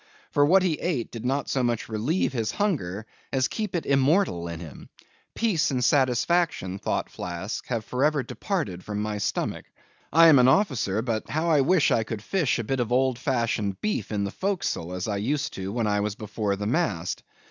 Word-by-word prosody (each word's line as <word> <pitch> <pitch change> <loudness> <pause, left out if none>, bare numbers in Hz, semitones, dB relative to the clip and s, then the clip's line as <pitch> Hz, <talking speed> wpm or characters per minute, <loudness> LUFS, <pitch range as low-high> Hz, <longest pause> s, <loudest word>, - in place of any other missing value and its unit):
For 145 - +4
what 185 +6 +5
he 165 -5 0
ate 145 -10 -2
did 115 -1 -7
not 140 +2 0
so 130 - 0
much 120 -2 -1
relieve 120 - 0
his 115 -4 -1
hunger, 110 - -1 0.3
as 130 -2 +2
keep 215 -4 -4
it 170 - -1
immortal 140 - +2
in 85 -1 -6
him. 80 -5 -10 0.5
Peace 210 -9 +1
and 130 -3 0
satisfaction, 130 - +1
thought 105 - -1
Flask, 90 +4 -5
have 115 -3 -2
for 125 +2 -1
ever 150 -2 +2
departed 120 - -3
from 105 -1 -4
my 105 0 -2
stomach. - - -2 0.5
I 165 +2 +7
am 145 -4 +7
an 125 - +6
officer; 130 - +2
but, 115 -3 -2
how 160 +2 0
I 150 -3 +5
wish 150 -1 +3
I 115 - +3
could 110 -1 -6
fish 170 - +1
a 115 - -2
bit 135 +4 -2
of 120 -1 -1
old 130 -1 +2
fashioned 115 -7 -1
beef 215 - -2
in 105 -1 0
the 100 - -2
forecastle, 185 - -2
as 90 +2 -3
I 100 -2 -1
used 145 +8 -1
to 95 0 -5
when 115 +1 -1
I 105 -1 +1
was 105 0 -1
before 105 -1 -2
the 105 +1 -4
mast. 100 - -1
125 Hz, 200 wpm, -26 LUFS, 105-150 Hz, 0.5 s, I